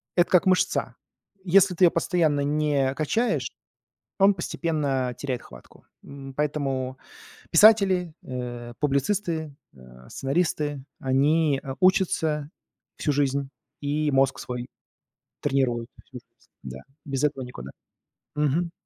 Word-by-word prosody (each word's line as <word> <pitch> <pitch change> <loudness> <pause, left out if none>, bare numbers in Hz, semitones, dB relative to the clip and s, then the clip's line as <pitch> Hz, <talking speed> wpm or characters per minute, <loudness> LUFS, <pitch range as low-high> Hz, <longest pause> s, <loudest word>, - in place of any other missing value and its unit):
это 175 0 +3
как 180 - +4
мышца. 185 -1 +1 0.5
Если 190 0 +4
ты 180 - +5
её 170 - +5
постоянно 165 -4 +1
не 145 -2 +1
качаешь, 155 - 0 0.7
он 200 +1 +5
постепенно 145 -8 -2
теряет 130 -2 -4
хватку. - - -16 0.2
М, 135 -1 -10
поэтому 135 -3 -2 0.5
писатели, 190 -3 +5
э, 120 -2 -6
публицисты, 160 +1 -1 0.2
э, 65 -1 -16
сценаристы, 145 -1 -1 0.2
они, 140 +2 +2
э, 135 -1 -5
учатся 160 -5 +2 0.5
всю 150 - 0
жизнь, 140 -1 0 0.3
и 150 +1 0
мозг 135 -1 +2
свой 125 0 -5 0.7
тренируют 120 -4 0 0.2
всю 130 - -12
жизнь, 120 - -33 0.4
да, 65 -1 -7 0.3
без 135 -2 -3
этого 145 -3 0
никуда. 70 - -9 0.7
Мгм. 150 +4 0
145 Hz, 115 wpm, -25 LUFS, 130-165 Hz, 0.7 s, ты